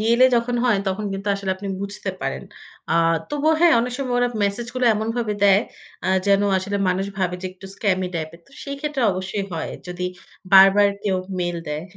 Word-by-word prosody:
Real 230 +3 +2
এ - - +9
যখন 240 +1 0
হয়, 225 -5 +3
তখন 195 +3 -3
কিন্তু 195 +1 -4
আসলে 200 -1 -3
আপনি 200 +1 -6
বুঝতে 200 0 -4
পারেন। - - -3 0.5
আ - - +3 0.4
তবুও 295 +2 +2
হ্যাঁ, 345 -1 +6
অনেক 245 +1 -2
সময় 255 -3 -2
ওরা 245 0 +2 0.2
মেসেজ 200 +4 -2
গুলো 255 0 0
এমনভাবে 220 0 -2
দেয়, 200 0 +6 0.5
আ - - 0 0.2
যেন 200 0 +4 0.2
আসলে 200 +2 -3
মানুষ 185 +2 0
ভাবে 180 -2 0
যে, 185 - -2
একটু 190 +1 -12
স্ক্যামি 190 -3 0
টাইপ 155 -1 -3
এর। 170 - -15
তো - - -24
সেই 280 0 -5
ক্ষেত্রে 295 -3 -2
অবশ্যই 190 +2 -3
হয়। 165 - -4 0.2
যদি 180 0 -6 0.5
বারবার 195 +1 +8 0.2
কেউ 195 -2 +1 0.2
মেইল 175 -1 -1
দেয়। 150 +1 -3
200 Hz, 200 wpm, -22 LUFS, 190-235 Hz, 0.5 s, এ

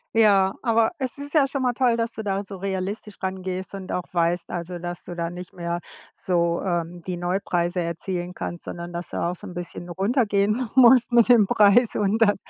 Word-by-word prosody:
Ja, 200 -4 +4
aber 230 -2 +2
es 260 -1 -4
ist 285 0 -7
ja 295 -4 +4
schon 275 0 -3
mal 250 -1 +2
toll, 245 -1 +2
dass 230 0 -1
du 220 - -6
da 200 -1 -2
so 195 -1 -9
realistisch 195 +2 -4
rangehst 185 0 -4
und 190 -1 -6
auch 180 - -1
weißt, 170 0 0
also, 175 0 -5
dass 175 0 -6
du 175 - -7
da 170 -1 -2
nicht 180 0 -9
mehr 170 -1 -3 0.4
so, 170 -2 0
ähm, 175 -1 -2
die 180 - -2
Neupreise 175 0 -1
erzielen 175 +1 -3
kannst, 175 -1 -6
sondern, 170 0 -6
dass 175 0 -5
du - - -6
da 170 - 0
auch 180 - -6
so - - -9
'n 180 - -8
bisschen 175 0 -6
runtergehen 210 +3 +1
musst 250 -1 +6
mit 235 0 +5
dem 230 -5 +6
Preis 215 +4 +5
und 210 +2 +1
das 205 -2 +5
190 Hz, 210 wpm, -24 LUFS, 175-225 Hz, 0.4 s, musst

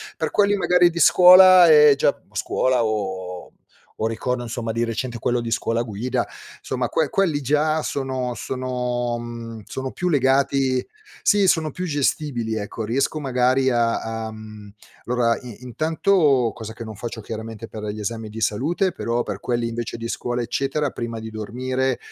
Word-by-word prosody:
Per - - -3
quelli 205 0 +3
magari 180 -2 +4
di 170 0 -5
scuola 185 +2 +8
è 150 -2 +8
già - - +2
scuola 130 -2 0
o 95 -4 -4 0.5
o 110 - 0
ricordo 120 +2 -2
insomma 115 -1 -4
di 115 +1 -1
recente 120 +1 -3
quello 120 +1 0
di 115 - -4
scuola 115 0 0
guida, 120 +3 -2 0.4
insomma 125 -2 -2
que 155 +4 0
quelli 165 -6 +1
già 150 +3 +1
sono 130 -4 -3
sono 125 -2 -3
mhmm, 115 -1 -8
sono 130 0 -5
più 180 - -3
legati 135 -3 +2 0.4
sì, 205 -2 +4
sono 160 -4 +2
più 180 +6 -5
gestibili, 140 -6 -1
ecco. 110 +1 -5
Riesco 135 +7 -1
magari 130 -1 +2
a 115 -1 +1 0.3
a - - -7
mhmm, 110 -1 -11 0.4
allora 120 -1 +1
i 125 -1 -11
intanto 150 - +2
cosa 110 -1 -8
che 115 - -8
non 110 -1 -7
faccio 115 +1 -6
chiaramente 110 +1 -7
per 110 -1 -8
gli 105 0 -5
esami 110 +1 -4
di 110 +1 -8
salute, 155 - 0
però 120 -4 -2
per 100 -2 -5
quelli 120 0 -1
invece 115 0 -5
di 115 0 -5
scuola 120 +1 -3
eccetera 135 +4 -1
prima 115 -1 -5
di 110 0 -8
dormire, 130 +4 -2
125 Hz, 165 wpm, -22 LUFS, 115-140 Hz, 0.5 s, scuola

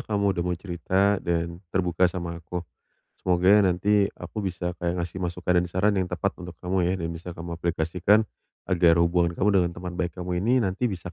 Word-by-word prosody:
kamu 100 -2 0
udah 85 - -2
mau 90 -1 -1
cerita 95 +3 0
dan 85 0 -2
terbuka 90 -1 +2
sama 85 -1 -5
aku. 85 +1 -5 0.6
Semoga 90 +3 +4
nanti 100 +2 +3
aku 110 - -6
bisa 90 -2 -3
kayak 85 0 -1
ngasih 90 +2 -7
masukan 90 0 +1
dan 90 - -1
saran 95 +4 +2
yang 90 - -2
tepat 90 +2 -1
untuk 90 -1 -8
kamu 90 -1 +1
ya, 90 - +1
dan 85 -3 -3
bisa 85 +1 -8
kamu 85 0 -6
aplikasikan 85 +6 +2 0.4
agar 85 -2 +4
hubungan 85 0 +2
kamu 105 - +2
dengan 85 -1 +1
teman 90 0 -6
baik 90 -1 -1
kamu 90 -1 -2
ini 125 +3 +3
nanti 95 +6 -2
bisa 90 -3 -6
90 Hz, 195 wpm, -26 LUFS, 85-95 Hz, 0.6 s, Semoga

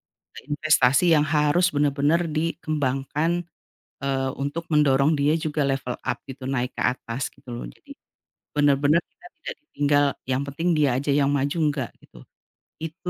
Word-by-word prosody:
eee, - - -15
investasi 150 +1 +3
yang 150 -1 +4
harus 155 +3 +2
benar-benar 150 +3 +2
dikembangkan, 155 +1 -1 0.6
eee, 135 -1 -1
untuk 145 +4 -3
mendorong 145 0 +4
dia 150 +2 +2
juga 155 -2 -2
level 135 -2 -2
up, - - -2
gitu, 135 -1 -8
naik 125 -1 -1
ke - - -7
atas, 125 0 -3
gitu - - -25
lo. 120 - -6
Jadi - - -14 0.6
benar-benar 145 +2 +3
kita 355 - -22
tidak - - -6
ditinggal, 145 - +2 0.2
yang 130 0 0
penting 145 +5 -3
dia 150 -2 +3
aja 140 0 -1
yang 140 -1 +3
maju, 140 +3 0
enggak, 135 -6 -4
gitu. - - -17 0.6
Itu 165 +3 -6
145 Hz, 150 wpm, -24 LUFS, 135-155 Hz, 0.6 s, yang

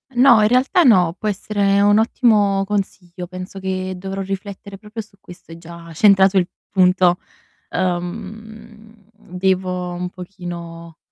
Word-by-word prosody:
No, 245 -3 +6
in 210 - +4
realtà 255 - +3
no, 180 - +4
può 215 - -3
essere 200 0 0
un 205 +1 +4
ottimo 210 -4 +2
consiglio, 185 -3 -4
penso 185 +1 -8
che 185 0 -3
dovrò 195 +1 -5
riflettere 195 0 -7
proprio 215 +1 -8
su 200 -1 -24
questo, 175 -2 -15
hai 165 - -10
già 170 0 -12
centrato 195 +1 +4
il 180 - -2 0.2
punto. 180 -1 +3 0.5
Uhm, 220 +4 -6
devo 180 -1 -2
un 180 0 -4
pochino 170 -3 -9
190 Hz, 135 wpm, -19 LUFS, 180-210 Hz, 0.5 s, No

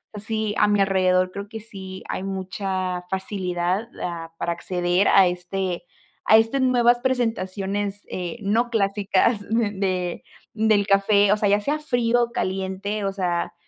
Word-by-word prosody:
sí, 215 0 -2
a - - +5
mi 205 -1 +2
alrededor, 185 -1 +2
creo 200 +1 -7
que 225 -1 -7
sí 190 -3 -9
hay - - -3
mucha 190 -1 -3
facilidad, 190 +1 -2
ah, 165 -2 -5
para 170 - -2
acceder 175 +2 0
a 195 - +6
este 180 0 -3 0.4
a 220 - +7
este 225 +5 +2
nuevas 240 -1 +4
presentaciones, 205 -5 -1
eh, 180 +5 -4
no 225 +4 +1
clásicas 205 0 +1
de 195 -5 -1 0.3
del 215 -2 +2
café, 200 +1 +4
o - - +1
sea, 205 -1 +1
ya 205 +1 +4
sea 295 +8 -1
frío 245 -4 +1
o 235 - -3
caliente. 195 +1 -3
O 195 - 0
sea, 180 -3 -2
200 Hz, 150 wpm, -23 LUFS, 185-220 Hz, 0.4 s, a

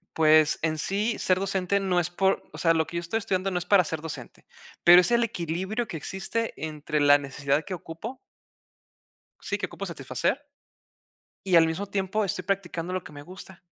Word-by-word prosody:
pues, 155 -1 +4
en 155 -1 0
sí, 205 +7 -1
ser 185 0 +2
docente 195 0 0
no 185 -2 +1
es 175 0 -1
por 190 +2 +1
o - - -10
sea, 165 -1 +3
lo 160 -1 +1
que 170 - -5
yo - - -1
estoy 175 +6 -2
estudiando 195 -2 -1
no 180 - -1
es 175 - -6
para 190 0 +5
ser 160 -1 -4
docente, 160 -1 -8 0.4
pero 175 +1 +9
es 180 - 0
el 235 0 +4
equilibrio 190 +3 -3
que 175 - -5
existe 195 +7 -3
entre 150 -1 -3
la 145 0 +6
necesidad 140 +1 -1
que 195 - -6
ocupo 180 +9 -7 1.2
sí, - - -2
que - - -2
ocupo - - -7
satisfacer. 285 - -2 1.0
Y 185 -2 +3
al 165 -1 +7
mismo 160 +5 -3
tiempo, 200 +2 -1
estoy 185 -1 -3
practicando 180 -2 -3
lo 185 - -3
que - - -12
me 145 - -9
gusta. 185 +3 -12
180 Hz, 195 wpm, -26 LUFS, 160-195 Hz, 1.2 s, pero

